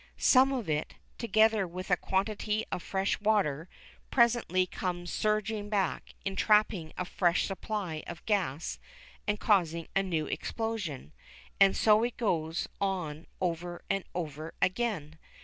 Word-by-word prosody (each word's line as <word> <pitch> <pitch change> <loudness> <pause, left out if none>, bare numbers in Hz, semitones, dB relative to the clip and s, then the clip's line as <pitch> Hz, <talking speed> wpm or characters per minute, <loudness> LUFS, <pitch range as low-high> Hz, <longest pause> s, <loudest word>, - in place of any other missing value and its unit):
Some 265 +1 +5
of 250 -7 -2
it, 150 -1 -1 0.2
together 220 -3 +3
with 185 +2 -6
a - - +7
quantity 210 +3 -1
of 180 - -2
fresh 195 +2 -1
water, 185 -7 +1 0.4
presently 235 -7 +3
comes 175 -1 -4
surging 215 0 0
back, 200 -4 -1
entrapping 195 -4 +2
a 180 - -2
fresh 175 -1 +2
supply 195 -5 -3
of 170 0 -8
gas 165 - -1 0.5
and 210 0 0
causing 170 -6 +2
a 195 - +4
new 170 -5 -1
explosion; 205 - -4 0.5
and 195 -1 +6
so 215 0 +5
it 240 +1 -1
goes 165 -7 0
on 175 -6 -2
over 175 -1 -3
and 195 -1 0
over 155 -2 -5
again. 185 -7 -1
190 Hz, 130 wpm, -30 LUFS, 170-215 Hz, 0.5 s, a